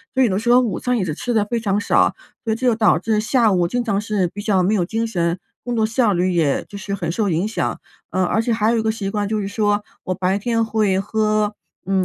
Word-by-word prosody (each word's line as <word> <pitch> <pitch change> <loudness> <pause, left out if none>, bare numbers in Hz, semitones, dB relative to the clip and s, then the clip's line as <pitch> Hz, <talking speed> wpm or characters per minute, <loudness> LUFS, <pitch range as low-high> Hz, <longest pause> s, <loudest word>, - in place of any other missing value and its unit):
所 260 - +4
以 - - +4
呢 190 +2 0
说 240 +2 +4
午 235 -5 -2
餐 250 -1 0
也 195 - 0
是 155 - -2
吃 240 +10 -4
得 215 -3 +2
非 235 +2 -2
常 205 -2 0
少， 205 - +2 0.3
所 225 - -1
以 - - +1
这 255 +3 -4
又 240 - +4
导 220 -1 +4
致 220 -2 0
下 230 -3 +3
午 175 -2 +2
经 245 +6 -1
常 205 -3 0
是 210 -4 0
比 205 +4 -7
较 200 -3 +2
没 200 +4 +2
有 180 -5 +1
精 225 +4 -2
神， 175 -5 -1 0.3
工 245 - -2
作 220 -1 +2
效 225 -1 +2
率 180 +1 +1
也 160 -5 +1
就 200 - -8
是 200 0 -5
很 170 -4 -3
受 210 +4 0
影 170 +4 0
响。 220 - -2 0.3
呃， 185 0 +1
而 215 +5 +1
且 230 0 0
还 220 0 +2
有 235 - +1
一 225 - +1
个 220 - 0
习 195 -3 -4
惯 205 -1 -1
就 215 0 -1
是 195 - -3
说 205 0 0 0.2
我 185 - -1
白 190 +2 0
天 230 +2 0
会 215 -4 +1
喝 215 +1 0 0.3
嗯 190 -1 +1
210 Hz, 295 characters per minute, -20 LUFS, 190-225 Hz, 0.3 s, 所